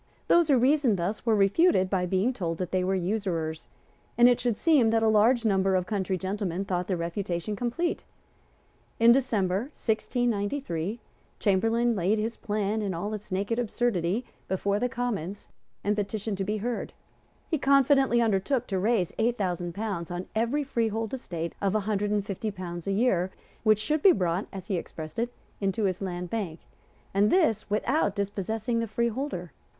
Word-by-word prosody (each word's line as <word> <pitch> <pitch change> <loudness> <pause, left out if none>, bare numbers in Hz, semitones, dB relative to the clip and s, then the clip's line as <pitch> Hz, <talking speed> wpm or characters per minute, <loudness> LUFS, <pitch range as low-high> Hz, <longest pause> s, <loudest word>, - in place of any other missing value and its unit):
Those 345 -2 +5
who 280 -4 +5
reasoned 260 -3 +3
thus 195 +7 -3
were 225 - +4
refuted 200 - +4
by 185 -1 0
being 190 +8 +1
told 170 -7 -3
that 180 -1 -4
they 185 -1 +1
were 190 +1 +1
usurers; 175 -5 -2 0.5
and 240 0 +8
it 245 0 +4
should 240 -3 0
seem 290 -9 +4
that 225 0 +2
a - - +4
large 225 +3 +4
number 195 -2 +3
of 180 -1 +1
country 190 -2 -1
gentlemen 190 0 -2
thought 180 -2 -2
the 185 - 0
refutation 175 +3 -3
complete. 245 - -2 1.0
In 230 +1 +7
December 225 -3 +1
1693 220 - -1 0.4
Chamberlayne 225 +4 +2
laid 195 +3 +1
his 225 +2 -2
plan, 210 -1 -1
in 195 -4 -2
all 205 +6 -3
its 210 -2 -7
naked 200 +5 -1
absurdity, 230 -3 0 0.2
before 200 +2 0
the 250 +2 0
Commons, 220 -6 -4 0.3
and 205 +1 +1
petitioned 205 0 -3
to - - +1
be 210 +2 -1
heard. 235 +3 -3 0.6
He 315 - +1
confidently 270 -3 +4
undertook 225 +4 +1
to 190 -2 0
raise 200 -3 +1
eight 235 +2 +2
thousand 175 -3 -2
pounds 200 -6 -3
on 175 +1 -4
every 235 +7 +1
freehold 225 -4 -1
estate 170 -10 -4
of 200 0 +1
a 215 - +2
hundred 205 0 -1
and 205 -1 0
fifty 205 +2 -3
pounds 175 -3 -6
a - - +1
year 195 -4 +2 0.3
which 215 -1 +4
should 300 +8 -1
be 385 - +7
brought, 180 -1 -1
as 190 -2 -7
he 195 -3 -1
expressed 155 +1 -7
it, 240 +1 -1 0.3
into 195 +2 -1
his 185 -1 0
Land 180 -2 -4
Bank, 190 -8 -3 0.5
and 200 +2 +4
this 230 - +2
without 215 +1 +1
dispossessing 210 +4 -2
the 230 - -1
freeholder. 230 - -2
210 Hz, 175 wpm, -27 LUFS, 185-235 Hz, 1.0 s, and